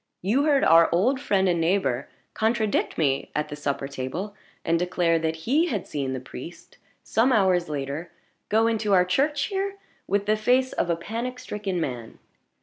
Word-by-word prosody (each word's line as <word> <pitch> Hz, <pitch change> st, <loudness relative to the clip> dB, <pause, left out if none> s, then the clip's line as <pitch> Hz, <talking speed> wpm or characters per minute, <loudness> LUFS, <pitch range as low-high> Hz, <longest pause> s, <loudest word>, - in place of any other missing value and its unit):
You 245 Hz, +10 st, +2 dB
heard 285 Hz, -3 st, +3 dB
our 165 Hz, +1 st, +6 dB
old 240 Hz, +10 st, +2 dB
friend 195 Hz, -8 st, +2 dB
and 170 Hz, -2 st, +1 dB
neighbor 165 Hz, -7 st, 0 dB, 0.2 s
contradict 220 Hz, -1 st, 0 dB
me 140 Hz, -4 st, 0 dB
at 150 Hz, 0 st, -1 dB
the 145 Hz, -, -5 dB
supper 140 Hz, -2 st, -3 dB
table, 140 Hz, +10 st, -5 dB, 0.3 s
and 165 Hz, 0 st, +2 dB
declare 175 Hz, -2 st, +1 dB
that 160 Hz, 0 st, -1 dB
he 305 Hz, +8 st, +3 dB
had 210 Hz, -, -2 dB
seen 135 Hz, -3 st, -3 dB
the 130 Hz, -, -3 dB
priest, 130 Hz, +6 st, -11 dB, 0.2 s
some 235 Hz, +4 st, +2 dB
hours 185 Hz, -7 st, +3 dB
later, 145 Hz, +3 st, -4 dB, 0.4 s
go 220 Hz, +1 st, +3 dB
into 220 Hz, -3 st, +1 dB
our 180 Hz, -1 st, +5 dB
church 280 Hz, +9 st, +1 dB
here 395 Hz, +1 st, -2 dB, 0.3 s
with 200 Hz, 0 st, 0 dB
the 215 Hz, -, +3 dB
face 250 Hz, +4 st, +2 dB
of 175 Hz, -, -1 dB
a 170 Hz, -, +2 dB
panic 230 Hz, +9 st, -5 dB
stricken 210 Hz, -7 st, -4 dB
man. 125 Hz, -7 st, -5 dB
190 Hz, 175 wpm, -25 LUFS, 160-230 Hz, 0.4 s, our